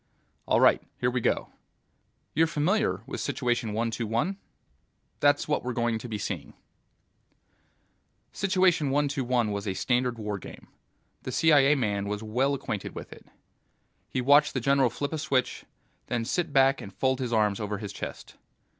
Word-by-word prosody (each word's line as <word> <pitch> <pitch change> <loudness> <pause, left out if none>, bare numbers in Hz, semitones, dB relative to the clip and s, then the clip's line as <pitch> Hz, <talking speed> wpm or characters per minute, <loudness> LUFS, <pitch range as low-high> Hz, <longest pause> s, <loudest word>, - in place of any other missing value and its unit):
"All - - +3
right. - - +5 0.2
Here 125 0 +1
we 125 0 -1
go. - - 0 0.8
You're 165 +2 +3
familiar 180 +8 0
with - - -6
Situation 120 -4 -1
One 115 +2 -1
Two 115 0 -3
One? 120 - -1 0.8
That's - - +3
what - - 0
we're 125 0 -3
going 120 -2 0
to 120 - -8
be 110 - -3
seeing." 100 - -5 1.8
Situation 185 -6 +2
One 145 +2 +2
Two 140 -1 -2
One 120 -3 +1
was 100 0 -4
a 95 - -1
standard 125 +4 0
war 105 -2 -4
game. - - -12 0.5
The - - -5
CIA 150 -3 +5
man 100 -6 -1
was 105 +1 -3
well 130 +6 +1
acquainted 105 -6 -5
with - - -8
it. - - -17 0.8
He 130 - -1
watched 145 +3 +5
the - - +1
general 135 0 +3
flip 145 +5 -4
a 160 - -2
switch, 130 -5 -1 0.4
then 120 -2 -1
sit 170 +5 -1
back 135 0 +4
and 100 - -8
fold 130 +7 0
his 125 -2 -3
arms 105 -3 +2
over 105 -1 -3
his 100 -1 -7
chest. - - -8
125 Hz, 170 wpm, -27 LUFS, 110-140 Hz, 1.8 s, right